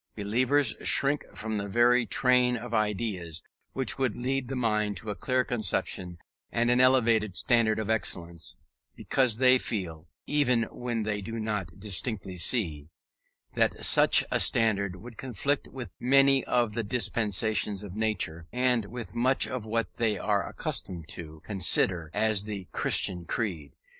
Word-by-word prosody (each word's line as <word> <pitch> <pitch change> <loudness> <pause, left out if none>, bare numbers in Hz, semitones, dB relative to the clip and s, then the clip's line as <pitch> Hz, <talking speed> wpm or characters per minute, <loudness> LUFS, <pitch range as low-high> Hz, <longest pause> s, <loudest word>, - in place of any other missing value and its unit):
Believers 120 +5 +1
shrink 140 +1 +3
from 110 -2 -3
every 120 +4 +3
train 125 +3 +3
of 120 0 -8
ideas 100 -7 -2 0.3
which 130 0 0
would 130 -5 0
lead 130 +1 -2
the 135 - -4
mind 105 -4 0
to 105 +3 -4
a - - -5
clear 130 +4 0
conception 95 -6 -3 0.3
and 120 +1 +1
an 125 +1 +3
elevated 115 -6 +3
standard 115 -1 +2
of 110 -2 -3
excellence, 85 -7 -2 0.4
because 125 -5 +1
they 130 0 +5
feel 90 -8 -4 0.2
(even 125 -6 +2
when 120 -2 -3
they 105 -1 -2
do 115 +3 -6
not 105 -5 -4
distinctly 100 -1 -3
see) 80 - +1 0.6
that - - 0
such - - +5
a - - +2
standard 100 -5 +2
would 115 +4 -12
conflict 135 +3 -2
with 120 -8 -9
many 135 +1 +4
of 120 -3 +1
the 115 - -1
dispensations 105 -2 0
of 100 -2 -9
nature, 95 -7 -1
and 125 -3 +1
with 110 -2 -8
much 130 +3 +2
of 125 -4 -5
what 115 +1 -2
they 110 -3 0
are 100 0 -1
accustomed 85 -4 -3
to 80 -1 -8
consider 90 -4 +1
as 110 -1 +2
the 100 -4 -6
Christian 90 -2 +2
creed. 85 -9 -3
110 Hz, 150 wpm, -28 LUFS, 100-125 Hz, 0.6 s, they